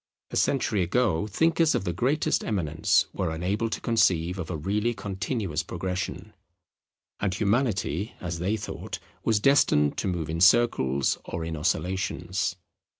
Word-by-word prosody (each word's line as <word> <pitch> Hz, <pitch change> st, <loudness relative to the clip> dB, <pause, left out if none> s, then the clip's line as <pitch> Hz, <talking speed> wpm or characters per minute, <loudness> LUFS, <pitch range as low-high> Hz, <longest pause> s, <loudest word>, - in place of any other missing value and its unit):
A -, -, -5 dB
century 115 Hz, -7 st, +1 dB
ago, 95 Hz, -1 st, +1 dB
thinkers 165 Hz, -, +2 dB
of -, -, 0 dB
the 90 Hz, -2 st, -2 dB
greatest 130 Hz, -, +1 dB
eminence 80 Hz, -8 st, +1 dB
were 90 Hz, -, -1 dB
unable 95 Hz, +8 st, -1 dB
to -, -, -3 dB
conceive 90 Hz, -6 st, +2 dB
of 80 Hz, -, -5 dB
a 85 Hz, -, -3 dB
really 105 Hz, +9 st, -1 dB
continuous 95 Hz, -, -3 dB
progression; 90 Hz, +2 st, -4 dB, 0.9 s
and 95 Hz, -3 st, -1 dB
Humanity, 105 Hz, -, 0 dB
as 85 Hz, -2 st, -4 dB
they 100 Hz, +6 st, 0 dB
thought, 110 Hz, -, -6 dB, 0.3 s
was 110 Hz, -2 st, +2 dB
destined 105 Hz, -, +3 dB
to -, -, -1 dB
move 85 Hz, -4 st, -2 dB
in 80 Hz, +1 st, -3 dB
circles 80 Hz, -, +3 dB
or 85 Hz, -1 st, -4 dB
in 80 Hz, 0 st, -4 dB
oscillations. 95 Hz, +3 st, -1 dB
95 Hz, 145 wpm, -26 LUFS, 85-110 Hz, 0.9 s, destined